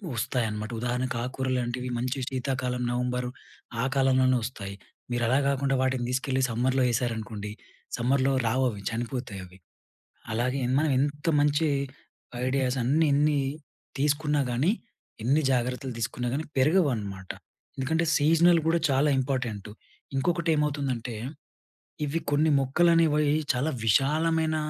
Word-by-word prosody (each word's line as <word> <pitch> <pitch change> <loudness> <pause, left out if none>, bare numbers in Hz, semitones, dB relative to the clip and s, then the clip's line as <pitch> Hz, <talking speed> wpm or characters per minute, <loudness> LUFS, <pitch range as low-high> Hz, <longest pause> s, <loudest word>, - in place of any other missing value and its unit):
వొస్తాయి 120 +1 0
అనమాట. 105 +2 -5
ఉదాహరణకు 125 +1 -1
ఆకుకూర 130 +1 -3
లాంటివి 125 +1 -3
మంచి 125 +3 -2
సీతాకాలం 130 -1 -2
నవంబర్, 125 0 -1 0.5
ఆ - - +1
కాలంలోనే 130 -1 +4
వొస్తాయి. 100 -5 -6 0.4
మీరు 120 0 0
అలా 130 +4 +3
గాకుండా, 140 0 +1
వాటిని 130 -2 0
తీసుకెళ్ళి 130 +1 0
సమ్మర్‌లో 130 +3 +1
ఏ‌సారనుకోండి. 110 -3 -3 0.5
సమ్మర్‌లో 130 +3 +2
రావు 130 +4 +2
అవి, 105 -3 -7
చనిపోతాయి 120 -3 -4
అవి. 90 +1 -16 0.7
అలాగే 125 +4 0 0.2
మనం 155 -1 +1
ఎంత 145 +2 -2
మంచి 150 +2 +2 0.8
ఐడియాస్ 130 0 0
అన్ని, 150 +7 +3
ఎన్ని 145 +1 +3 0.6
తీసుకున్నా 150 +1 +1
గానీ, 135 +10 +2 0.5
ఎన్ని 140 +5 +3
జాగ్రత్తలు 125 +1 -1
తీసుకున్నా 120 +2 -2
గానీ, 155 +3 -2
పెరగవనమాట. 125 - +1 0.5
ఎందుకంటే 160 +5 0
సీజనల్ 165 +3 +5
గూడా 170 +1 +3
చాలా 140 +2 +3
ఇంపార్టెంటు. 125 -6 -2 0.4
ఇంకొకటి 170 +4 0
ఏమవుతుందంటే, 140 -6 -1 0.9
ఇవి 150 +3 -1
కొన్ని 155 +2 +3
మొక్కలు 140 +6 +3
అనేవి, 150 -3 +3 0.2
చాలా 135 +4 0
విశాలమైన 155 +7 +2
130 Hz, 120 wpm, -27 LUFS, 120-145 Hz, 0.9 s, సీజనల్